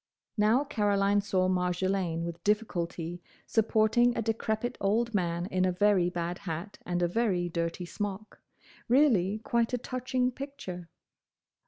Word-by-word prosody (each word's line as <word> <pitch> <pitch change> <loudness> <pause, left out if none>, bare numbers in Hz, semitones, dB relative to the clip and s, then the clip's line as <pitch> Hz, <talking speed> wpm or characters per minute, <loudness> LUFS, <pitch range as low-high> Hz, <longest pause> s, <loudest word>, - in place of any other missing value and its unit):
Now 220 +5 +3
Caroline 205 -6 +2
saw 190 -2 +1
Marjolaine 180 -1 0
with 170 0 -6
difficulty 175 -5 -1 0.2
supporting 225 +2 +3
a - - +1
decrepit 225 +1 -1
old 230 +4 +1
man 175 -3 0
in 185 -1 0
a 185 - +3
very 185 -1 +3
bad 175 0 -3
hat 170 +3 -6
and 175 0 0
a - - +3
very 180 -3 0
dirty 170 +1 -2
smock. 205 +3 -5 0.5
Really 230 -7 +4
quite 235 +2 +1
a - - +2
touching 255 +1 -1
picture. 215 -11 -7
200 Hz, 135 wpm, -29 LUFS, 175-225 Hz, 0.5 s, Really